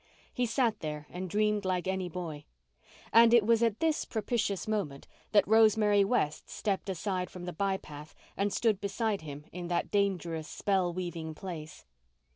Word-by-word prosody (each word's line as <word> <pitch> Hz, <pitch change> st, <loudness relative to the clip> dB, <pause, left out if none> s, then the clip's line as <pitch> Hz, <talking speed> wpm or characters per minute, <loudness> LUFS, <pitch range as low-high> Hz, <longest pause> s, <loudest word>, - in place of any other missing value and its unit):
He 245 Hz, -1 st, 0 dB
sat 230 Hz, -2 st, +1 dB
there 150 Hz, -1 st, -5 dB
and 180 Hz, +1 st, -5 dB
dreamed 210 Hz, +2 st, +1 dB
like 185 Hz, -1 st, -1 dB
any 190 Hz, -1 st, -1 dB
boy. 160 Hz, -4 st, -6 dB, 0.7 s
And 230 Hz, +1 st, +8 dB
it 225 Hz, -3 st, +5 dB
was 230 Hz, 0 st, +4 dB
at 230 Hz, -2 st, +2 dB
this 320 Hz, -2 st, +1 dB
propitious 220 Hz, -2 st, -2 dB
moment 195 Hz, -11 st, -2 dB, 0.2 s
that 205 Hz, -2 st, +5 dB
Rosemary 215 Hz, -2 st, +5 dB
West 195 Hz, -8 st, 0 dB
stepped 200 Hz, -2 st, -2 dB
aside 185 Hz, 0 st, -2 dB
from 180 Hz, -1 st, -8 dB
the 180 Hz, -, -5 dB
by 195 Hz, +2 st, 0 dB
path 150 Hz, -2 st, -11 dB, 0.2 s
and 200 Hz, +1 st, 0 dB
stood 215 Hz, -3 st, +1 dB
beside 205 Hz, +1 st, -1 dB
him 145 Hz, -1 st, -8 dB
in 175 Hz, 0 st, -6 dB
that 175 Hz, 0 st, -1 dB
dangerous, 175 Hz, -6 st, 0 dB
spell 190 Hz, -3 st, 0 dB
weaving 170 Hz, -3 st, -5 dB
place. 160 Hz, -4 st, -8 dB
195 Hz, 165 wpm, -30 LUFS, 175-215 Hz, 0.7 s, And